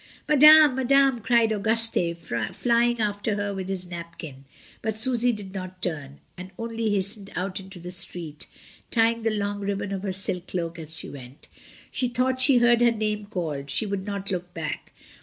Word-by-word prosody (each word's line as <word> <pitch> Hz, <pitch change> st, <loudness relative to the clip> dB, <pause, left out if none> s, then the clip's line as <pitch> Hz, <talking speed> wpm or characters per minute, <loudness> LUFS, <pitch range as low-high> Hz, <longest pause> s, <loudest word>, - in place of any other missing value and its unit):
"Madame! 300 Hz, 0 st, +8 dB
Madame!" 265 Hz, 0 st, +3 dB
cried 230 Hz, 0 st, +2 dB
Auguste, 220 Hz, -5 st, +2 dB, 0.4 s
flying 240 Hz, 0 st, +2 dB
after 205 Hz, 0 st, -1 dB
her 205 Hz, 0 st, -2 dB
with 190 Hz, -1 st, -5 dB
his 185 Hz, -2 st, -3 dB
napkin; 170 Hz, -5 st, -9 dB, 0.4 s
but 220 Hz, -1 st, -3 dB
Susy 245 Hz, +1 st, +3 dB
did 205 Hz, -4 st, -8 dB
not 185 Hz, -1 st, -7 dB
turn, 145 Hz, -6 st, -5 dB, 0.2 s
and 180 Hz, +1 st, -9 dB
only 230 Hz, -1 st, -3 dB
hastened 200 Hz, 0 st, -1 dB
out 185 Hz, +1 st, -3 dB
into 190 Hz, 0 st, -11 dB
the 180 Hz, +1 st, -8 dB
street, 175 Hz, -5 st, -1 dB, 0.4 s
tying 230 Hz, 0 st, +2 dB
the 225 Hz, -, +1 dB
long 205 Hz, -1 st, -2 dB
ribbon 200 Hz, 0 st, -3 dB
of 195 Hz, -1 st, -3 dB
her 195 Hz, -1 st, -3 dB
silk 185 Hz, -1 st, -1 dB
cloak 170 Hz, -2 st, -4 dB
as 160 Hz, 0 st, -9 dB
she -, -, -6 dB
went. 130 Hz, 0 st, -12 dB, 0.4 s
She 250 Hz, -, +1 dB
thought 255 Hz, +1 st, 0 dB
she 255 Hz, -1 st, +6 dB
heard 240 Hz, 0 st, +4 dB
her 240 Hz, -, +6 dB
name 210 Hz, -2 st, -3 dB
called, 155 Hz, -8 st, -4 dB
she 180 Hz, -, 0 dB
would 200 Hz, -2 st, -3 dB
not 200 Hz, -1 st, -4 dB
look 180 Hz, -1 st, -4 dB
back. 155 Hz, -2 st, -5 dB
200 Hz, 175 wpm, -25 LUFS, 180-230 Hz, 0.4 s, Madame